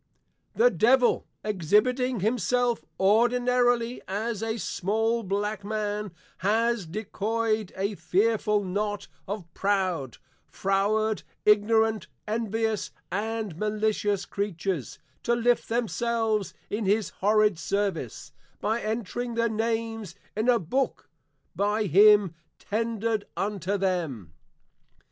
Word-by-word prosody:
The -, -, +5 dB
Devil, 245 Hz, +2 st, +3 dB, 0.2 s
Exhibiting 215 Hz, -, +1 dB
himself 240 Hz, +2 st, +1 dB, 0.2 s
ordinarily 245 Hz, +3 st, +3 dB
as 215 Hz, +3 st, -2 dB
a 225 Hz, 0 st, -2 dB
small 225 Hz, +4 st, 0 dB
Black 205 Hz, 0 st, -2 dB
man, 210 Hz, -1 st, -2 dB, 0.3 s
has 225 Hz, 0 st, +1 dB
decoy'd 215 Hz, +2 st, -1 dB
a 200 Hz, +2 st, -1 dB
fearful 210 Hz, +1 st, +1 dB
knot 205 Hz, +2 st, -2 dB, 0.2 s
of 200 Hz, -2 st, -4 dB
proud, 185 Hz, -10 st, 0 dB, 0.3 s
froward, 205 Hz, +2 st, +1 dB, 0.2 s
ignorant, 215 Hz, -1 st, +3 dB, 0.2 s
envious 220 Hz, 0 st, -1 dB, 0.2 s
and 215 Hz, -1 st, -2 dB
malicious 210 Hz, -1 st, 0 dB
creatures, 190 Hz, -6 st, -3 dB, 0.2 s
to 235 Hz, -, +1 dB
lift 240 Hz, 0 st, +1 dB
themselves 230 Hz, -2 st, 0 dB
in 210 Hz, +1 st, -2 dB
his 205 Hz, +2 st, +2 dB
horrid 210 Hz, -2 st, +3 dB
Service, 165 Hz, -, -2 dB, 0.3 s
by 225 Hz, +2 st, 0 dB
entring 230 Hz, +2 st, -3 dB
their 230 Hz, 0 st, +2 dB
Names 225 Hz, -3 st, -2 dB, 0.2 s
in 220 Hz, +4 st, +1 dB
a 245 Hz, -, +6 dB
Book 250 Hz, -, -2 dB, 0.4 s
by 210 Hz, +2 st, +1 dB
him 205 Hz, 0 st, +6 dB, 0.2 s
tendred 225 Hz, -1 st, -1 dB
unto 200 Hz, -1 st, -1 dB
them. 165 Hz, -, -2 dB
215 Hz, 100 wpm, -27 LUFS, 200-230 Hz, 0.4 s, a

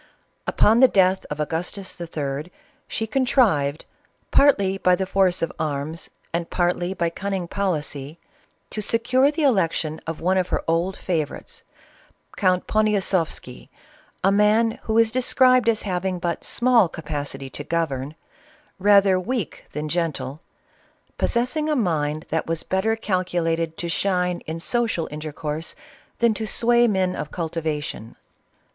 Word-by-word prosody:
Upon 220 Hz, +3 st, +4 dB
the 260 Hz, -, +8 dB
death 190 Hz, -3 st, +2 dB
of 150 Hz, -, -5 dB
Agustus*III. 165 Hz, -2 st, -4 dB, 0.4 s
she 220 Hz, -, -2 dB
contrived, 215 Hz, -, +2 dB, 0.5 s
partly 200 Hz, -9 st, +4 dB
by 180 Hz, -1 st, +4 dB
the 190 Hz, +1 st, -2 dB
force 190 Hz, -2 st, +2 dB
of 165 Hz, -, -1 dB
arms 155 Hz, +1 st, -3 dB, 0.2 s
and 170 Hz, 0 st, -2 dB
partly 175 Hz, +1 st, 0 dB
by 170 Hz, -2 st, 0 dB
cunning 190 Hz, -1 st, -3 dB
policy, 155 Hz, -6 st, -3 dB, 0.5 s
to 215 Hz, -, -3 dB
secure 245 Hz, +6 st, +2 dB
the 300 Hz, +1 st, -2 dB
election 170 Hz, -, +1 dB
of 165 Hz, -1 st, -4 dB
one 185 Hz, +3 st, +2 dB
of 180 Hz, -, 0 dB
her -, -, -1 dB
old 170 Hz, +4 st, 0 dB
favorites, 160 Hz, -6 st, -4 dB, 0.7 s
Count 185 Hz, -2 st, +2 dB
Ponia 215 Hz, -1 st, +2 dB
sofsky, 165 Hz, -9 st, -2 dB, 0.5 s
a 195 Hz, -, +4 dB
man 215 Hz, +3 st, +3 dB
who 220 Hz, 0 st, 0 dB
is 230 Hz, -1 st, +4 dB
described 255 Hz, 0 st, +4 dB
as 220 Hz, -2 st, +1 dB
having 185 Hz, -1 st, -1 dB
but 175 Hz, -2 st, -3 dB
small 235 Hz, -6 st, +3 dB
ca 165 Hz, -, -9 dB
pacity 145 Hz, -3 st, -4 dB
to 145 Hz, -, -5 dB
govern, 150 Hz, -3 st, -2 dB, 0.6 s
rather 200 Hz, -1 st, +5 dB
weak 225 Hz, -, -4 dB
than 150 Hz, +1 st, -4 dB
gentle, 155 Hz, -4 st, -2 dB, 0.8 s
possessing 250 Hz, +6 st, 0 dB
a 305 Hz, -, +2 dB
mind 155 Hz, -, 0 dB
that 160 Hz, 0 st, -1 dB
was 165 Hz, -1 st, -2 dB
better 200 Hz, +4 st, 0 dB
calculated 175 Hz, -5 st, -1 dB
to 170 Hz, -, -3 dB
shine 180 Hz, 0 st, 0 dB
in 160 Hz, +1 st, -4 dB
social 225 Hz, -3 st, 0 dB
intercourse 150 Hz, +1 st, -5 dB, 0.4 s
than 235 Hz, -1 st, +3 dB
to 220 Hz, 0 st, -4 dB
sway 240 Hz, +2 st, +3 dB
men 190 Hz, -3 st, +1 dB
of 150 Hz, -, -5 dB
cultivation. 155 Hz, -8 st, -4 dB
180 Hz, 140 wpm, -23 LUFS, 160-215 Hz, 0.8 s, the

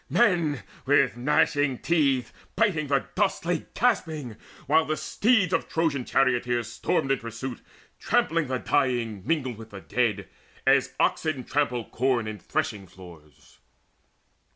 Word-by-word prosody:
Men, 170 Hz, -, +2 dB, 0.2 s
with 140 Hz, -3 st, +4 dB
gnashing 140 Hz, +1 st, +2 dB
teeth 140 Hz, -7 st, +1 dB, 0.2 s
Biting 185 Hz, -8 st, +1 dB
the 140 Hz, -1 st, +1 dB
dust, 200 Hz, -3 st, 0 dB
lay 175 Hz, +1 st, -1 dB
gasping, 160 Hz, -, 0 dB, 0.3 s
while 160 Hz, +3 st, +4 dB
the 155 Hz, 0 st, -2 dB
steeds 210 Hz, -5 st, +2 dB
Of -, -, 0 dB
Trojan 155 Hz, -6 st, 0 dB
charioteers 120 Hz, -3 st, +1 dB
stormed 135 Hz, -, 0 dB
in 135 Hz, -, +2 dB
pursuit, 115 Hz, +2 st, -6 dB, 0.4 s
Trampling 165 Hz, -2 st, +1 dB
the 130 Hz, 0 st, -1 dB
dying 120 Hz, -7 st, 0 dB
mingled 130 Hz, -8 st, -1 dB
with 110 Hz, -1 st, -10 dB
the 100 Hz, -2 st, -10 dB
dead 105 Hz, -7 st, -1 dB, 0.4 s
As -, -, +3 dB
oxen 155 Hz, -5 st, 0 dB
trample 125 Hz, -4 st, -1 dB
corn 125 Hz, -2 st, 0 dB
in 110 Hz, -1 st, -6 dB
threshing 100 Hz, +2 st, -3 dB
floors. 85 Hz, -5 st, -16 dB
135 Hz, 130 wpm, -26 LUFS, 115-155 Hz, 0.4 s, with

